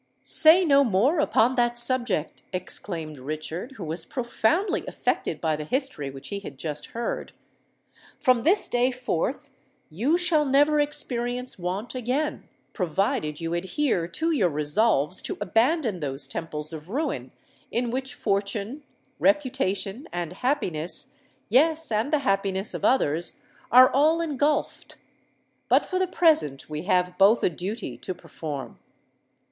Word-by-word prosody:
"Say 335 +4 +7
no 280 -3 +5
more 245 - +2
upon 245 -4 +3
that 240 -1 +1
subject," 240 - 0
exclaimed 170 -4 -4
Richard, 155 - -6
who 215 - -8
was 160 +2 -2
profoundly 255 - 0
affected - - -2
by 160 -2 0
the 150 - -5
history 255 - 0
which 135 0 -9
he 200 - -3
had 145 -9 -10
just 150 0 -4
heard. 235 +1 -4 0.9
"From 255 -4 +3
this 365 - +3
day 245 +1 +2
forth 255 - -3 0.4
you 250 - +1
shall 350 -4 +2
never 290 +2 +3
experience 250 -5 -2
want 185 +6 -4
again—provided 200 - -2
you 165 0 -3
adhere 185 - -1
to 325 - -2
your 210 - +2
resolves 150 +2 +1
to - - -5
abandon 225 - +1
those 135 -2 -3
temples 150 +2 -5
of 155 +2 -9
ruin 285 +9 -3 0.4
in 240 0 -1
which 260 0 -3
fortune, 205 +6 -2 0.4
reputation, 260 -6 0
and 175 -1 -4
happiness—yes, 260 - +1
and 220 +6 0
the 305 - +3
happiness 195 0 0
of - - -6
others—are 235 - +3
all 310 +4 +3
engulphed. 295 -2 -1 0.7
But - - +4
for 370 - -2
the 375 - +1
present 305 - +2
we 155 +2 -6
have 180 -2 +1
both 205 +4 +5
a - - +3
duty 195 +7 -5
to 185 - -5
perform. 155 -5 -7
225 Hz, 130 wpm, -25 LUFS, 175-275 Hz, 0.9 s, Say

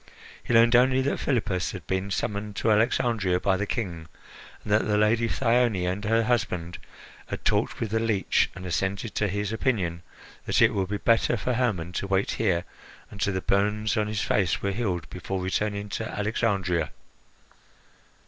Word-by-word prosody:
He - - -4
learned 115 +1 +6
only 130 +2 +5
that 140 - -1
Philippus 100 - -1
had - - -8
been 95 +1 -2
summoned 100 +1 -3
to 110 - +1
Alexandria 105 -4 +2
by 95 +1 +2
the 105 +2 -2
King, 85 -9 -4 0.6
and 105 - -1
that 105 - +3
the 105 -1 +2
Lady 110 +2 +3
Thyone 115 -7 +2
and 95 +3 -2
her 115 +1 +3
husband 90 -7 -1 0.5
had - - -6
talked - - +1
with 110 -3 -3
the 110 - +1
leech 110 -4 +1
and 95 0 -8
assented 95 +6 -2
to 105 - 0
his 100 +2 -2
opinion 95 -9 -1 0.5
that - - +2
it - - +5
would 95 -2 -1
be 105 - -1
better 115 +2 +2
for 125 +4 -1
Hermon 110 -9 -1
to 100 - -3
wait 95 0 +1
here 90 -6 0 0.5
until 100 0 -1
the 95 - -1
burns 105 +4 +1
on 105 -1 +1
his 105 -1 -2
face 95 -4 +1
were 100 - -1
healed 95 -6 -2
before 95 +1 -4
returning 100 +2 -2
to 110 +2 -4
Alexandria. 100 -6 0
105 Hz, 175 wpm, -26 LUFS, 95-115 Hz, 0.6 s, learned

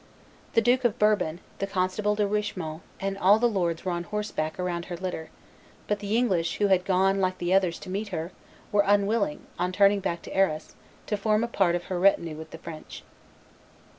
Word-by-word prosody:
The 230 - +5
Duke 245 +3 +3
of 240 -4 +1
Bourbon, 205 -6 +2 0.2
the 195 - -1
constable 195 +2 0
De 210 0 +1
Richemont, 185 -6 -3 0.2
and 195 0 -3
all 200 +3 +6
the 235 - +1
lords 175 -6 -1
were 185 - 0
on 175 0 -3
horseback 200 -5 -3
around 175 -1 -2
her 175 - -6
litter; 180 -3 -5 0.6
but 210 0 -1
the 205 +2 0
English, 185 -9 +1
who 205 -1 +2
had 185 -1 +3
gone, 195 +1 +3
like 185 0 0
the 175 +1 0
others, 185 -3 +3
to - - -8
meet 205 +3 -2
her, 170 -2 -4 0.4
were 205 0 +4
unwilling, 200 -3 +1
on 180 +1 0
turning 200 +1 +4
back 170 -3 -3
to - - -8
Arras, 165 -5 +1 0.3
to 210 - -1
form 215 +2 +2
a - - 0
part 190 -7 +2
of 175 - -3
her 185 -1 -3
retinue 170 -4 +3
with 160 +1 -9
the 160 - -9
French. 160 -1 -9
190 Hz, 200 wpm, -27 LUFS, 175-205 Hz, 0.6 s, all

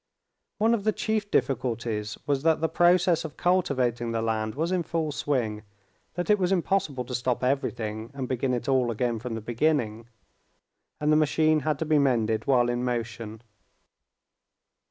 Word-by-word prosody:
One 225 +2 +3
of 220 -4 0
the 215 - +3
chief 215 -1 -1
difficulties 115 - -1
was 140 -2 0
that 160 +1 +3
the 160 - +1
process 175 0 +3
of 160 -2 -8
cultivating 130 -10 +1
the 115 -1 -1
land 110 0 -1
was 165 +4 -1
in 185 -1 +1
full 160 -1 -2
swing, 120 -7 -1 0.5
that 175 0 -2
it 210 - +4
was 180 0 +1
impossible 175 -8 0
to 125 - -7
stop 125 0 -1
everything 115 -4 -2
and 130 -2 -4
begin 130 0 0
it 120 - -5
all 130 -3 +2
again 115 0 -1
from 120 0 -5
the 115 - -5
beginning, 115 -2 0 0.9
and 150 0 +1
the - - +5
machine 155 +1 +3
had 150 0 -1
to 160 - -2
be 155 -1 +3
mended 115 -5 +1
while 125 -3 +4
in 120 0 -1
motion. 115 -2 -4
130 Hz, 170 wpm, -26 LUFS, 115-160 Hz, 0.9 s, the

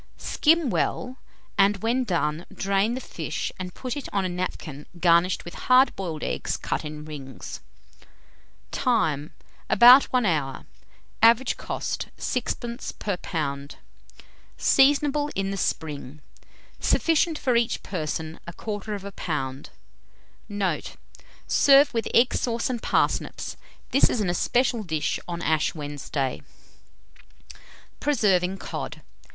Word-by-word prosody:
Skim 315 -4 +2
well, 255 +1 -1 0.4
and 195 0 +3
when 245 +3 +2
done, 165 -4 -1
drain 195 +4 0
the - - -3
fish 160 - -4
and 180 -1 -6
put 255 -2 -4
it 285 - -6
on 195 -2 0
a - - -1
napkin 175 -5 -5
garnished 170 +1 +3
with 175 - -8
hard 255 +1 +4
boiled 165 -6 -4
eggs - - -2
cut - - -3
in 150 0 -7
rings. 140 -4 -8 1.1
Time. 160 - 0 0.4
About 250 +3 +9
1 250 -3 +1
hour. 145 -7 -1 0.6
Average 235 +3 +5
cost, - - -4
6d. 240 -1 -3
per 200 -3 -2
lb. 140 -5 -4 0.8
Seasonable 290 +1 +3
in 195 0 -1
the - - -2
spring. 150 -5 -3 0.6
Sufficient 325 0 +2
for 255 -4 +1
each 235 -1 +1
person, 160 -2 -4
1/4 205 +3 -5
lb. 150 -9 -4 0.8
Note. 195 -6 -2 0.5
Serve 280 0 +5
with 230 -1 -1
egg 240 +2 +4
sauce 235 +1 -1
and 240 -3 -3
parsnips. - - 0 0.4
This 275 - +5
is 245 - -1
an 195 -4 +1
especial 240 +6 +1
dish 160 -6 -1
on 170 -1 -4
Ash 155 0 +1
Wednesday. 145 -2 -3 1.6
PRESERVING 195 -10 +2
COD. - - -6
195 Hz, 120 wpm, -25 LUFS, 155-245 Hz, 1.6 s, About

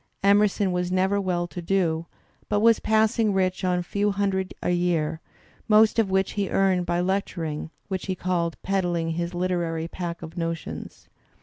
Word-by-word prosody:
Emerson 200 -1 +3
was 180 0 -1
never 190 +2 +2
well 180 -2 0
to 175 +1 -7
do, 170 -2 0 0.4
but 205 - +2
was 230 +1 +5
passing 220 -1 +2
rich 185 -1 0
on 180 -1 +2
a 180 - -1
few 205 +3 0
hundred 195 -2 -1
a - - +1
year, 165 -3 0 0.5
most 215 +1 +5
of 215 -4 +2
which 190 0 +1
he 200 -2 -2
earned 185 -2 +2
by 175 0 +1
lecturing, 175 -5 -2 0.2
which 190 -1 -4
he 190 - -1
called 170 -2 -1
"peddling 175 -4 0
his 170 +2 -3
Uterary 175 -2 -1
pack 170 -1 -5
of 160 - -9
notions." 165 -1 -5
185 Hz, 170 wpm, -25 LUFS, 170-195 Hz, 0.5 s, was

